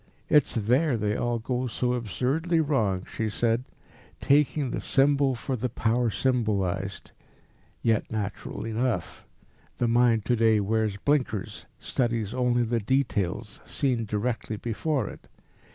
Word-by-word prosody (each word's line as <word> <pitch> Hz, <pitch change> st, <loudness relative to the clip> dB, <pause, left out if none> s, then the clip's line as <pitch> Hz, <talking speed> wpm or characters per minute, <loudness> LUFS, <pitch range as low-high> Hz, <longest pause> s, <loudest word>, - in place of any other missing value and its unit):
"It's 150 Hz, -3 st, +4 dB
there 125 Hz, +5 st, +2 dB
they 105 Hz, -1 st, 0 dB
all 120 Hz, -1 st, 0 dB
go 125 Hz, +2 st, -2 dB
so 125 Hz, +1 st, -1 dB
absurdly 130 Hz, -, 0 dB
wrong," 110 Hz, -12 st, +1 dB
she 110 Hz, -1 st, -3 dB
said, 115 Hz, +3 st, 0 dB, 0.5 s
"taking 145 Hz, -1 st, +2 dB
the -, -, -2 dB
symbol 140 Hz, -1 st, +3 dB
for 130 Hz, +3 st, -3 dB
the 125 Hz, +1 st, -2 dB
power 115 Hz, +1 st, +1 dB
symbolised. 100 Hz, -6 st, -1 dB, 0.7 s
Yet 110 Hz, -2 st, +1 dB
natural 105 Hz, 0 st, -4 dB
enough. 115 Hz, -4 st, -2 dB, 0.5 s
The 120 Hz, -, +1 dB
mind 115 Hz, -2 st, +3 dB
to 125 Hz, -, +2 dB
day 110 Hz, -2 st, +4 dB
wears 105 Hz, 0 st, 0 dB
blinkers, 130 Hz, -4 st, -1 dB
studies 115 Hz, -4 st, -1 dB
only 125 Hz, -1 st, +2 dB
the 115 Hz, 0 st, 0 dB
details 105 Hz, -4 st, -1 dB
seen 125 Hz, -5 st, -1 dB
directly 110 Hz, +1 st, -2 dB
before 120 Hz, +2 st, -1 dB
it. -, -, -10 dB
115 Hz, 130 wpm, -27 LUFS, 110-130 Hz, 0.7 s, It's